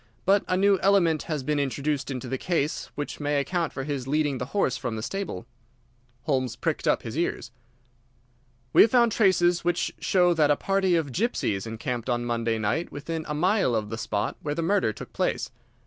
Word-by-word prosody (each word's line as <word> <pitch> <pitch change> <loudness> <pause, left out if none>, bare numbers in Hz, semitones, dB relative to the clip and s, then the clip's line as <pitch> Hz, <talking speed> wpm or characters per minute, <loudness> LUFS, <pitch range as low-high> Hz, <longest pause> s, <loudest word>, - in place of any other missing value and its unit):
But 200 +1 +4
a 185 - +1
new 195 0 +4
element 175 -6 +3
has 150 -4 -2
been 150 +1 0
introduced 140 +1 -1
into 130 -1 -4
the 130 +1 -3
case 160 -4 -1
which 145 - -5
may 145 -1 0
account 165 +3 -1
for 135 - -5
his 135 -3 -4
leading 145 -2 0
the 125 - -4
horse 140 -8 0
from 120 -3 -4
the 110 - -5
stable." 190 - -4 0.8
Holmes 130 -4 0
pricked - - -2
up - - +2
his 115 - -6
ears. 160 -7 -2 1.2
"We - - +8
have 230 - +7
found 235 -1 +4
traces 180 -5 +3
which 175 0 0
show 180 -2 +3
that 155 -3 +3
a 145 - +5
party 195 0 +1
of 155 -5 0
gypsies 120 - -1
encamped 120 +2 -4
on 120 -1 0
Monday 115 -1 0
night 110 +11 -1
within 160 +2 -5
a 150 - -1
mile 180 - +2
of 105 -1 -2
the - - -2
spot 105 -2 -2
where 145 -1 -3
the 165 - -1
murder 190 - +2
took 105 - -10
place. - - -1
150 Hz, 195 wpm, -26 LUFS, 125-175 Hz, 1.2 s, We